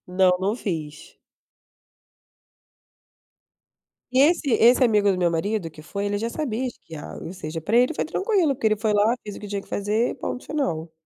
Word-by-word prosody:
Não, 180 Hz, 0 st, +3 dB
não 200 Hz, +3 st, 0 dB
fiz. 155 Hz, -9 st, -6 dB, 3.0 s
E 255 Hz, -, +3 dB
esse 295 Hz, +1 st, +4 dB
esse 240 Hz, +3 st, +5 dB
amigo 210 Hz, -4 st, +3 dB
do 190 Hz, -, +1 dB
meu 175 Hz, -2 st, +2 dB
marido 175 Hz, +1 st, -2 dB
que 155 Hz, -, -13 dB
foi 200 Hz, +6 st, -5 dB
ele 205 Hz, 0 st, -1 dB
já 230 Hz, +3 st, -2 dB
sabia 255 Hz, -3 st, -2 dB
esquiar. 165 Hz, -10 st, -9 dB
Ou 165 Hz, -, -6 dB
seja 165 Hz, -3 st, -6 dB
para 210 Hz, +9 st, +1 dB
ele 250 Hz, +5 st, +4 dB
foi -, -, -1 dB
tranquilo, 375 Hz, -3 st, +1 dB
porque 235 Hz, -4 st, 0 dB
ele 215 Hz, -, +2 dB
foi 215 Hz, +1 st, 0 dB
lá, 210 Hz, +3 st, +3 dB
fez 205 Hz, -2 st, -7 dB
o -, -, -9 dB
que 210 Hz, -, -8 dB
tinha 200 Hz, 0 st, -3 dB
que -, -, -21 dB
fazer 210 Hz, +4 st, 0 dB
e -, -, -5 dB
ponto 250 Hz, -, -5 dB
final. 170 Hz, -, -2 dB
210 Hz, 190 wpm, -24 LUFS, 180-245 Hz, 3.0 s, esse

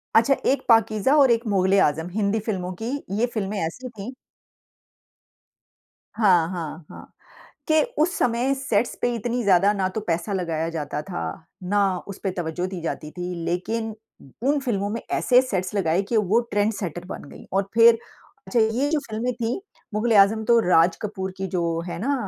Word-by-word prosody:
अच्छा, 230 Hz, +5 st, +5 dB
एक 275 Hz, -, +2 dB
पाकीज़ा 225 Hz, +3 st, +4 dB
और 275 Hz, -4 st, +6 dB
एक 235 Hz, +1 st, +1 dB
मुग़ल-ए-आज़म, 190 Hz, -5 st, +2 dB
हिंदी 215 Hz, +1 st, +1 dB
फ़िल्मों 185 Hz, -4 st, -2 dB
की 230 Hz, -, -2 dB, 0.3 s
ये 235 Hz, -, +3 dB
फ़िल्में 205 Hz, -1 st, -2 dB
ऐसी 250 Hz, +11 st, -6 dB
थीं 220 Hz, +1 st, -8 dB, 2.0 s
हाँ, 180 Hz, -7 st, +4 dB
हाँ, 165 Hz, -2 st, -6 dB
हाँ। -, -, -12 dB, 0.6 s
के 310 Hz, 0 st, +4 dB, 0.2 s
उस 355 Hz, +4 st, +1 dB
समय 245 Hz, +3 st, +1 dB
सेट्स 240 Hz, -4 st, 0 dB
पे 245 Hz, -, +1 dB
इतनी 240 Hz, +2 st, -2 dB
ज़्यादा 195 Hz, 0 st, +4 dB
ना 195 Hz, -2 st, 0 dB
तो 220 Hz, -, -1 dB
पैसा 170 Hz, +4 st, -1 dB
लगाया 165 Hz, -3 st, -1 dB
जाता 150 Hz, -3 st, -4 dB
था, 115 Hz, -, -6 dB, 0.4 s
ना 195 Hz, 0 st, +1 dB
उसपे 195 Hz, -1 st, -4 dB
तवज्जो 175 Hz, 0 st, -3 dB
दी 185 Hz, -3 st, -6 dB
जाती 155 Hz, -2 st, -4 dB
थी, 180 Hz, +1 st, -5 dB
लेकिन 220 Hz, +6 st, -2 dB, 0.5 s
उन 285 Hz, +2 st, +2 dB
फ़िल्मों 205 Hz, -7 st, -1 dB
में 230 Hz, +2 st, -3 dB
ऐसे 250 Hz, 0 st, +4 dB
सेट्स 190 Hz, -8 st, -3 dB
लगाए 175 Hz, -2 st, +2 dB
कि 235 Hz, -, +2 dB
वो 210 Hz, +2 st, +3 dB
ट्रेंड 205 Hz, +1 st, +2 dB
सेटर 175 Hz, -3 st, -5 dB
बन 185 Hz, -, -8 dB
गई। -, -, -12 dB
और 195 Hz, 0 st, 0 dB
फिर 230 Hz, 0 st, +7 dB, 0.5 s
अच्छा 240 Hz, -, +1 dB
ये 225 Hz, +6 st, +2 dB
जो 315 Hz, -, +2 dB
फ़िल्में 230 Hz, +3 st, -2 dB
थी, 235 Hz, +5 st, -2 dB, 0.3 s
मुग़ल-ए-आज़म 215 Hz, -1 st, +4 dB
तो 235 Hz, +1 st, +5 dB
राज 165 Hz, 0 st, +5 dB
कपूर 190 Hz, -3 st, -4 dB
की 190 Hz, 0 st, -3 dB
जो 170 Hz, -2 st, -1 dB
है -, -, -5 dB
ना 275 Hz, +7 st, 0 dB
205 Hz, 170 wpm, -24 LUFS, 180-230 Hz, 2.0 s, फिर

